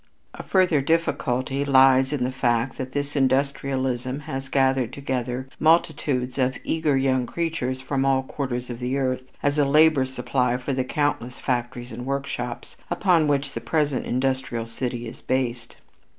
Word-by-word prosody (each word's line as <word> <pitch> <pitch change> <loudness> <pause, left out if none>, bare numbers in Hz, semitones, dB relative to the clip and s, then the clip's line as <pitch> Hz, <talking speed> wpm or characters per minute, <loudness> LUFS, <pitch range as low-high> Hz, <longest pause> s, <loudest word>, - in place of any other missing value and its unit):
A - - -7
further 180 -6 +3
difficulty 140 -4 0
lies 135 -1 +5
in 145 -4 -1
the 125 - 0
fact 120 -1 0
that 130 0 -4
this 145 +1 -3
industrialism 135 -1 0
has 135 -3 -5
gathered 130 -2 +2
together 130 -2 -3
multitudes 140 -5 +2
of 130 0 +1
eager 155 -4 +1
young 130 -2 +1
creatures 155 -6 -2
from 135 0 -1
all 135 -1 +2
quarters 125 -3 -4
of 120 - -6
the 125 +2 -1
earth 130 -2 0 0.2
as 145 +1 +1
a - - +5
labor 150 -1 +5
supply 125 -1 0
for 125 +2 -3
the 130 0 0
countless 130 -3 -1
factories 120 0 -2
and 125 +3 -7
workshops, 135 -3 -4
upon 170 -5 +3
which 140 -1 0
the 115 - -4
present 145 +3 0
industrial 130 -2 -1
city 120 0 -4
is 115 - -10
based. 125 -2 -2
130 Hz, 155 wpm, -24 LUFS, 125-140 Hz, 0.2 s, lies